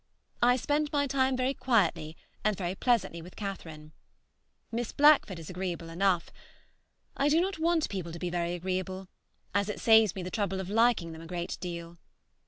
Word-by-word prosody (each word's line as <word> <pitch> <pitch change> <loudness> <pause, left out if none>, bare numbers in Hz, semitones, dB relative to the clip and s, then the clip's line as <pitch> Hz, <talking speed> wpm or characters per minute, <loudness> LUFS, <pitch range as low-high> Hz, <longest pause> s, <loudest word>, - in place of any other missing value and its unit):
I 245 +1 +5
spent 290 +3 0
my 285 -1 +2
time 265 -1 +1
very 255 +1 +1
quietly 180 - +1 0.3
and 215 -2 +1
very 180 -2 -2
pleasantly 220 -6 0
with 180 +2 -12
Catherine. 160 -7 -7 0.8
Miss 235 0 -2
Blackford 290 - +5
is 165 -2 -9
agreeable 180 -2 -4
enough. 180 0 +1 0.8
I 280 +1 +2
do 310 +3 +4
not 380 -1 -1
want 330 -1 +2
people 180 -4 -5
to 170 - -7
be 175 +1 -3
very 175 0 -1
agreeable, 185 +1 -4 0.4
as 200 +1 +1
it 210 - -4
saves 220 -4 +5
me 190 - -4
the 180 - -5
trouble 200 -3 -1
of 190 0 -5
liking 225 -6 +3
them 160 0 -9
a 165 - -10
great 175 0 -4
deal. 170 -1 -6
190 Hz, 180 wpm, -29 LUFS, 175-245 Hz, 0.8 s, I